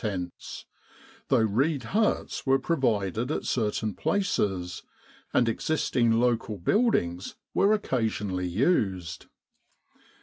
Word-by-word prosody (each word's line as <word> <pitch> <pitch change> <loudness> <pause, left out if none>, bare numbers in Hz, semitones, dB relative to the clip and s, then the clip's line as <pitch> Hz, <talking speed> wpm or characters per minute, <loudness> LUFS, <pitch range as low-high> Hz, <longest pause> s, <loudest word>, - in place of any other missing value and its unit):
tents, 90 -5 -5 0.6
though - - +3
reed 130 +7 +1
huts 210 - 0
were 135 0 +3
provided 120 - 0
at 155 - -2
certain 110 -2 -1
places, 95 - -1 0.5
and 120 - +3
existing 120 -1 +1
local 115 -3 0
build 215 - +2
ings 85 +2 -2 0.2
were 200 +2 +4
occasionally 110 - -1
used. 95 - 0
115 Hz, 100 wpm, -27 LUFS, 95-135 Hz, 0.6 s, were